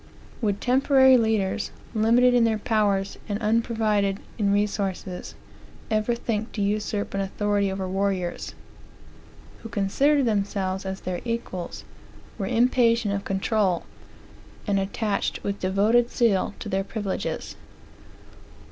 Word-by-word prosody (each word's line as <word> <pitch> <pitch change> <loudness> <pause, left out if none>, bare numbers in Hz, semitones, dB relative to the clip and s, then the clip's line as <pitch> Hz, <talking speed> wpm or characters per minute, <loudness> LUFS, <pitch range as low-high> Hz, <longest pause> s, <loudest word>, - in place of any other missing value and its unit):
Would 205 -3 0
temporary 265 +1 +5
laders, 220 -3 +1 0.2
limited 235 +3 +4
in 245 -1 +4
their 225 -1 +2
powers, 205 -3 0
and 205 - 0
unprovided 215 -3 +1 0.2
in 200 -2 +2
resources, 200 -2 -2 0.6
ever 215 +2 +1
think 225 -1 -3
to 210 - -3
usurp 205 0 -1
an 195 - 0
authority 200 0 0
over 190 -1 -3
warriors, 190 -2 -2 1.1
who 225 - -8
considered 270 +8 +2
themselves 195 -3 -1
as 190 0 -5
their 180 -1 -4
equals, 230 -7 -4 0.6
were 195 - -2
impatient 230 -2 +3
of 200 0 -2
control, 195 -2 0 0.8
and 200 -2 +1
attached 200 +1 -2
with 200 0 -3
devoted 210 +6 +2
zeal 215 -6 +1
to - - -7
their 195 -1 0
privileges? 205 -1 -4
205 Hz, 120 wpm, -25 LUFS, 195-230 Hz, 1.1 s, temporary